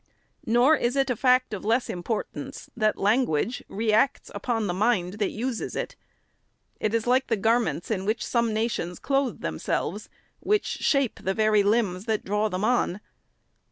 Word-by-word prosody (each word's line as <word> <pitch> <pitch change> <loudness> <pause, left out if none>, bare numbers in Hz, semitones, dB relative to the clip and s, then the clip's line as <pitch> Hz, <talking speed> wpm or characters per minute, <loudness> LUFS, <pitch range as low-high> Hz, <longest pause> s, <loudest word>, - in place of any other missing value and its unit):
Nor 245 +7 +5
is 240 0 0
it 270 -1 +2
a - - 0
fact 255 0 +3
of 200 - -5
less 230 +4 +1
importance, 195 +5 -5
that 215 -3 +1
language 220 - +1
re 215 +1 0
acts 225 +5 +2
upon 225 -3 -1
the 180 - -1
mind 200 -1 0
that 205 - +1
uses 235 +1 -3
it. - - -4 0.8
It 215 +1 0
is 225 - 0
like 255 +2 +2
the 225 - +1
garments 225 -3 +1
in 190 -3 -1
which 215 +3 -1
some 235 -2 +1
nations 215 -5 -2
clothe 275 -4 -1
themselves, 80 - -3 0.3
which 420 0 +1
shape 275 -5 0
the 190 0 -1
very 215 -1 +4
limbs 200 -2 +1
that 220 -2 -1
draw 210 +2 0
them 185 0 -3
on. 220 -5 +1
220 Hz, 165 wpm, -26 LUFS, 205-245 Hz, 0.8 s, Nor